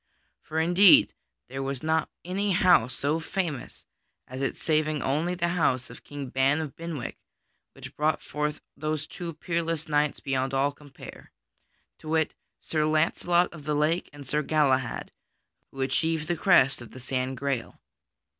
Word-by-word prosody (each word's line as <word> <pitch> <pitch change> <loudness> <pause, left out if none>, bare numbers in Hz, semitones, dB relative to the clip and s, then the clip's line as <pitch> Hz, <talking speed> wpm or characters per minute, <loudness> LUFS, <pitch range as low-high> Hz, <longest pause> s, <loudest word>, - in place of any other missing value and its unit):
For 160 - -3
indeed 175 +4 +6 0.3
there 135 +2 -5
was 135 0 -3
not 160 0 +1 0.2
any 195 +2 0
house 175 -9 +4
so 150 +3 0
famous 165 -5 -4 0.4
as 130 +1 -6
it 135 - -1
saving 155 -1 0
only 160 +6 0
the 175 -1 0
house 140 -7 +1
of - - -13
King 145 -2 -7
Ban 135 +4 +2
of 155 -4 -5
Benwick, 165 -6 -6 0.5
which - - -11
brought 155 +1 +1
forth 150 0 -3
those 155 0 -2
two 175 +1 -6
peerless 165 -1 -2
knights 150 -1 +1
beyond 135 0 -1
all 140 +2 +2
compare: 145 -1 -13 0.7
to 155 - -9
wit, 160 -1 +1 0.2
Sir 155 -1 -1
Launcelot 170 +3 +2
of 150 -3 -11
the 150 -1 0
Lake 155 +4 +1
and 145 -1 -11
Sir 150 +4 0
Galahad, 135 -5 +1 0.6
who 135 - -7
achieved 155 +4 0
the 175 - 0
quest 145 -8 +4
of 120 - -10
the 130 - -9
San 130 +1 -2
Grail. 135 -2 -3
150 Hz, 155 wpm, -27 LUFS, 135-165 Hz, 0.7 s, indeed